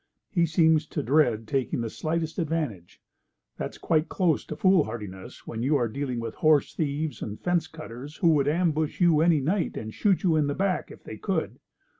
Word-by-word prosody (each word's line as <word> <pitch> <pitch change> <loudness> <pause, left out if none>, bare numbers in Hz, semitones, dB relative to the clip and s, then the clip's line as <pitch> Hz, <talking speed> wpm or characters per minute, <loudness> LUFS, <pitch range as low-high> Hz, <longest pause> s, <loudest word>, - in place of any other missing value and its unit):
He 170 -4 +2
seems 160 -1 +3
to 150 - -3
dread 120 -6 +2
taking 130 -1 -1
the 115 - -3
slightest 160 +1 -2
advantage. 150 - -3 0.6
That's - - -5
quite 155 -1 +1
close 175 -6 +1
to - - -6
foolhardiness 120 - 0
when 115 - -5
you 140 +5 +2
are 120 -4 +2
dealing 125 +1 -3
with 115 -1 -4
horse 155 -3 +3
thieves 150 0 -2
and 105 0 -5
fence 175 -3 0
cutters 150 -2 -9
who 170 - +3
would 145 -3 +3
ambush 155 -1 0
you 170 -4 +4
any 165 -3 +4
night, 175 +7 -1
and 110 0 -6
shoot 195 -4 +1
you 170 -4 +3
in 150 -2 +2
the 145 - -1
back 195 -1 -1
if - - -13
they - - -8
could. - - -2
155 Hz, 190 wpm, -26 LUFS, 130-165 Hz, 0.6 s, you